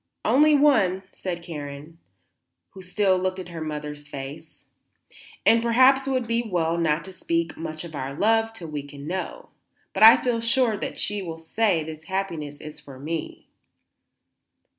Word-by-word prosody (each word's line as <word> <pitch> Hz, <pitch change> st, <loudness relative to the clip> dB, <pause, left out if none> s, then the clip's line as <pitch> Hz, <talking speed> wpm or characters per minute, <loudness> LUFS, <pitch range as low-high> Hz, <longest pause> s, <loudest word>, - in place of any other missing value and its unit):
"Only 300 Hz, +2 st, +5 dB
one," 220 Hz, -11 st, +3 dB
said 175 Hz, -2 st, -5 dB
Karen, 150 Hz, 0 st, -8 dB, 0.7 s
who 190 Hz, -, -11 dB
still 185 Hz, 0 st, +1 dB
looked 185 Hz, 0 st, -1 dB
at 180 Hz, -2 st, -7 dB
her 165 Hz, -2 st, -7 dB
mother's 150 Hz, -1 st, -6 dB
face. 145 Hz, +3 st, -9 dB, 0.8 s
"And 230 Hz, 0 st, +6 dB
perhaps 260 Hz, +3 st, +4 dB
it -, -, 0 dB
will 260 Hz, -1 st, +1 dB
be 230 Hz, +1 st, 0 dB
well 175 Hz, -7 st, -1 dB
not 155 Hz, -1 st, +1 dB
to 190 Hz, -, -8 dB
speak 170 Hz, -2 st, -2 dB
much 155 Hz, -1 st, -6 dB
of 170 Hz, -2 st, -9 dB
our 135 Hz, -2 st, -4 dB
love 225 Hz, +4 st, +2 dB
till 175 Hz, -8 st, -9 dB
we 150 Hz, -1 st, -3 dB
can 140 Hz, 0 st, -11 dB
know. 185 Hz, +4 st, -5 dB, 0.4 s
But -, -, -3 dB
I 220 Hz, +1 st, +10 dB
feel 240 Hz, -2 st, -1 dB
sure 230 Hz, -1 st, +2 dB
that -, -, -5 dB
she 205 Hz, 0 st, 0 dB
will 165 Hz, -3 st, -6 dB
say 170 Hz, +1 st, 0 dB
this 155 Hz, 0 st, -9 dB
happiness 165 Hz, -7 st, -4 dB
is 155 Hz, 0 st, -10 dB
for 135 Hz, -2 st, -12 dB
me." 160 Hz, +3 st, -5 dB
175 Hz, 165 wpm, -25 LUFS, 155-225 Hz, 0.8 s, I